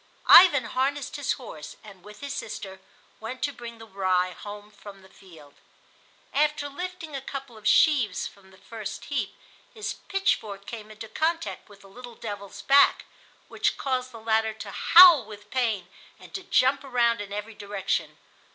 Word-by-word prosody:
Ivan 315 Hz, -9 st, +8 dB
harnessed 275 Hz, +4 st, -2 dB
his 285 Hz, -2 st, 0 dB
horse, 155 Hz, -, -10 dB
and, 195 Hz, -4 st, -14 dB
with 210 Hz, +3 st, -13 dB
his 280 Hz, -1 st, -5 dB
sister, 190 Hz, -3 st, -7 dB, 0.4 s
went 250 Hz, +4 st, -7 dB
to 285 Hz, -, -1 dB
bring 235 Hz, -2 st, -9 dB
the 225 Hz, -, -12 dB
rye 185 Hz, -3 st, 0 dB
home 205 Hz, +2 st, -10 dB
from 205 Hz, -1 st, -13 dB
the 190 Hz, -, -17 dB
field. 160 Hz, -8 st, -17 dB, 0.8 s
After 300 Hz, 0 st, +1 dB
lifting 340 Hz, 0 st, -7 dB
a 270 Hz, -, -4 dB
couple 270 Hz, -2 st, -8 dB
of 215 Hz, -1 st, -5 dB
sheaves 245 Hz, -, +3 dB
from 195 Hz, -1 st, -12 dB
the 190 Hz, -, -19 dB
first 215 Hz, +2 st, -8 dB
heap 245 Hz, -9 st, -3 dB, 0.4 s
his 430 Hz, -1 st, -4 dB
pitchfork 215 Hz, -, -1 dB
came 215 Hz, -2 st, -8 dB
into 215 Hz, +1 st, -9 dB
contact 325 Hz, +3 st, -2 dB
with 200 Hz, -1 st, -17 dB
the 195 Hz, -, -16 dB
little 240 Hz, +4 st, -12 dB
devil's 205 Hz, -2 st, -8 dB
back, 280 Hz, +5 st, +5 dB, 0.4 s
which -, -, -1 dB
caused 255 Hz, -1 st, -2 dB
the 230 Hz, -, -10 dB
latter 220 Hz, 0 st, +1 dB
to -, -, -8 dB
howl 345 Hz, -6 st, +8 dB
with 210 Hz, -1 st, -13 dB
pain 225 Hz, -8 st, -1 dB, 0.3 s
and -, -, -15 dB
to 385 Hz, -, -4 dB
jump 270 Hz, -6 st, +2 dB
around 240 Hz, -4 st, +1 dB
in 200 Hz, -1 st, -8 dB
every 210 Hz, +2 st, -5 dB
direction. 205 Hz, -2 st, -3 dB
225 Hz, 170 wpm, -26 LUFS, 205-275 Hz, 0.8 s, Ivan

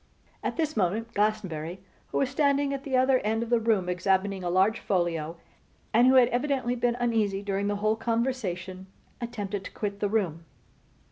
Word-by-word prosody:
At -, -, -2 dB
this 315 Hz, -2 st, -1 dB
moment 215 Hz, +3 st, 0 dB
Glastonbury, 190 Hz, -5 st, -1 dB, 0.3 s
who -, -, -3 dB
was 265 Hz, -2 st, +1 dB
standing 280 Hz, 0 st, +2 dB
at 275 Hz, -1 st, -4 dB
the 270 Hz, -3 st, 0 dB
other 260 Hz, 0 st, +4 dB
end 225 Hz, +1 st, 0 dB
of 235 Hz, -, -7 dB
the 240 Hz, -, +4 dB
room 220 Hz, -5 st, +1 dB
examining 190 Hz, +2 st, 0 dB
a 175 Hz, -, -1 dB
large 190 Hz, +5 st, +3 dB
folio, 170 Hz, -4 st, -1 dB, 0.6 s
and 240 Hz, +3 st, +6 dB
who 260 Hz, -, +6 dB
had 250 Hz, -2 st, +6 dB
evidently 250 Hz, -1 st, 0 dB
been 240 Hz, -1 st, 0 dB
uneasy 215 Hz, -5 st, 0 dB
during 200 Hz, 0 st, -1 dB
the 205 Hz, -, 0 dB
whole 215 Hz, +2 st, +1 dB
conversation, 220 Hz, -6 st, -2 dB, 0.3 s
attempted 205 Hz, -4 st, -4 dB
to -, -, -7 dB
quit 200 Hz, -1 st, -4 dB
the 205 Hz, -, 0 dB
room. 180 Hz, -7 st, -1 dB
215 Hz, 180 wpm, -27 LUFS, 190-245 Hz, 0.6 s, and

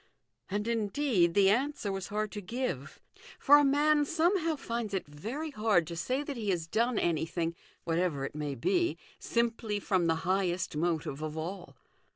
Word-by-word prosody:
And, 205 Hz, +2 st, -2 dB
indeed, 215 Hz, -5 st, +1 dB
the 195 Hz, -1 st, +6 dB
answer 255 Hz, -2 st, 0 dB
was 195 Hz, -2 st, -4 dB
hard 210 Hz, 0 st, -2 dB
to 205 Hz, -, -5 dB
give; 185 Hz, -, -4 dB, 0.4 s
for 290 Hz, +1 st, +7 dB
a -, -, +4 dB
man 295 Hz, +2 st, +4 dB
somehow 330 Hz, +2 st, +1 dB
finds 235 Hz, -6 st, -3 dB
it 190 Hz, -, -2 dB
very 230 Hz, -, -5 dB
hard 210 Hz, -, +2 dB
to 170 Hz, +1 st, -6 dB
say 255 Hz, -, -1 dB
that 285 Hz, -1 st, -5 dB
he 215 Hz, -3 st, -2 dB
has 175 Hz, -4 st, 0 dB
done 230 Hz, +7 st, +1 dB
anything, 165 Hz, 0 st, 0 dB, 0.3 s
whatever 165 Hz, -4 st, 0 dB
it -, -, -6 dB
may 150 Hz, -2 st, -3 dB
be, 345 Hz, -, +1 dB, 0.2 s
simply 230 Hz, -3 st, -1 dB
from 185 Hz, -4 st, +1 dB
the 165 Hz, -, +3 dB
highest 185 Hz, -2 st, 0 dB
motive 155 Hz, -3 st, -1 dB
of 155 Hz, 0 st, -4 dB
all. 170 Hz, -3 st, -6 dB
200 Hz, 170 wpm, -30 LUFS, 170-255 Hz, 0.4 s, for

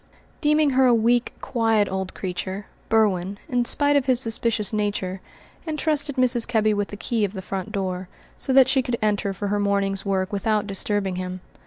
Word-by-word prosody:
Deeming 300 Hz, -1 st, +3 dB
her 260 Hz, 0 st, +4 dB
a 240 Hz, -, +5 dB
weak, 235 Hz, +2 st, +2 dB
quiet 225 Hz, -4 st, +1 dB
old 190 Hz, 0 st, -4 dB
creature, 190 Hz, +2 st, -5 dB, 0.2 s
Berwin, 200 Hz, -3 st, +1 dB
in 245 Hz, -1 st, 0 dB
spite 290 Hz, +3 st, +4 dB
of 280 Hz, -1 st, +1 dB
his 255 Hz, -2 st, +4 dB
suspicious 225 Hz, -3 st, +1 dB
nature, 200 Hz, -3 st, -2 dB, 0.5 s
entrusted 300 Hz, -2 st, 0 dB
Mrs. 250 Hz, -3 st, +2 dB
Kebby 215 Hz, -3 st, +2 dB
with 205 Hz, -1 st, -1 dB
the 205 Hz, -, -9 dB
key 225 Hz, +1 st, -1 dB
of 200 Hz, -1 st, -1 dB
the 190 Hz, -, -6 dB
front 195 Hz, +2 st, -5 dB
door, 185 Hz, -3 st, -3 dB, 0.3 s
so -, -, -2 dB
that 260 Hz, -1 st, +6 dB
she 265 Hz, 0 st, +3 dB
could 245 Hz, -1 st, -3 dB
enter 205 Hz, -2 st, 0 dB
for 200 Hz, +1 st, -4 dB
her 205 Hz, 0 st, 0 dB
morning's 200 Hz, -1 st, 0 dB
work 195 Hz, -1 st, -1 dB
without 210 Hz, +1 st, 0 dB
disturbing 195 Hz, -1 st, -1 dB
him. 185 Hz, 0 st, -5 dB
210 Hz, 185 wpm, -23 LUFS, 195-245 Hz, 0.5 s, that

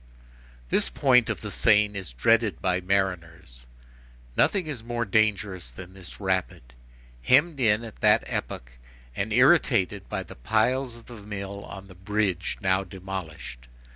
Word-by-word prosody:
This -, -, +1 dB
point 125 Hz, -5 st, +3 dB
of -, -, -3 dB
the 105 Hz, -, -6 dB
Seine 105 Hz, -1 st, +3 dB
is 95 Hz, -9 st, -6 dB
dreaded 105 Hz, -, +2 dB
by 90 Hz, 0 st, 0 dB
mariners. 85 Hz, -10 st, -3 dB, 0.7 s
Nothing 195 Hz, -4 st, +2 dB
is 140 Hz, -7 st, -6 dB
more 120 Hz, 0 st, -2 dB
dangerous 100 Hz, -, 0 dB
than 90 Hz, +9 st, -11 dB
this 95 Hz, -2 st, -12 dB
rapid, 95 Hz, -11 st, -2 dB, 0.5 s
hemmed 145 Hz, -, +3 dB
in, 110 Hz, -2 st, +2 dB
at 115 Hz, -2 st, -11 dB
that -, -, +4 dB
epoch, -, -, -5 dB, 0.4 s
and 100 Hz, +8 st, -3 dB
irritated 115 Hz, -, +3 dB
by -, -, -3 dB
the -, -, -12 dB
piles 115 Hz, -, 0 dB
of 115 Hz, -, -15 dB
the 120 Hz, -, -12 dB
mill 100 Hz, -1 st, -7 dB
on 95 Hz, 0 st, -10 dB
the 95 Hz, -, -14 dB
bridge, 95 Hz, -1 st, -2 dB
now 95 Hz, 0 st, +1 dB
demolished. 95 Hz, -10 st, -8 dB
100 Hz, 145 wpm, -26 LUFS, 95-115 Hz, 0.7 s, that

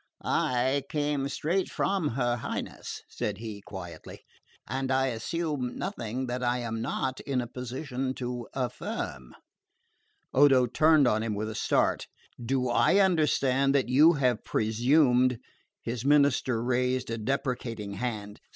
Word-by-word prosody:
"I 130 Hz, +3 st, +1 dB
come 145 Hz, -2 st, -1 dB
straight 175 Hz, +7 st, -1 dB
from 195 Hz, -5 st, 0 dB
her 120 Hz, -2 st, +1 dB
Highness," -, -, -5 dB
said 105 Hz, -2 st, -3 dB
he 110 Hz, -2 st, -7 dB
quietly, 90 Hz, -6 st, -9 dB, 0.4 s
"and 130 Hz, +3 st, -2 dB
I 135 Hz, 0 st, +2 dB
assume 135 Hz, +1 st, -3 dB
nothing 130 Hz, -, -3 dB
that 125 Hz, 0 st, -3 dB
I 120 Hz, 0 st, +1 dB
am 115 Hz, -2 st, -3 dB
not 130 Hz, +2 st, -2 dB
in 135 Hz, -2 st, -2 dB
a 120 Hz, -, -2 dB
position 130 Hz, +2 st, -4 dB
to 125 Hz, -1 st, -4 dB
affirm." 110 Hz, -, -4 dB, 1.0 s
Odo 135 Hz, -2 st, +6 dB
turned 155 Hz, +3 st, +4 dB
on 110 Hz, -2 st, +2 dB
him 110 Hz, -2 st, -2 dB
with 110 Hz, +2 st, -3 dB
a -, -, -6 dB
start. 110 Hz, -, +1 dB, 0.4 s
"Do 130 Hz, +1 st, 0 dB
I 120 Hz, +10 st, +3 dB
understand 140 Hz, -7 st, +3 dB
that 135 Hz, -3 st, +2 dB
you 150 Hz, +6 st, +6 dB
have 125 Hz, -6 st, +1 dB
presumed 125 Hz, +2 st, +3 dB, 0.2 s
?" -, -, -46 dB
His 115 Hz, 0 st, -4 dB
minister 140 Hz, -4 st, +3 dB
raised 125 Hz, 0 st, 0 dB
a 115 Hz, -, -3 dB
deprecating 115 Hz, -3 st, -3 dB
hand. 105 Hz, -1 st, -4 dB
125 Hz, 140 wpm, -28 LUFS, 115-140 Hz, 1.0 s, Odo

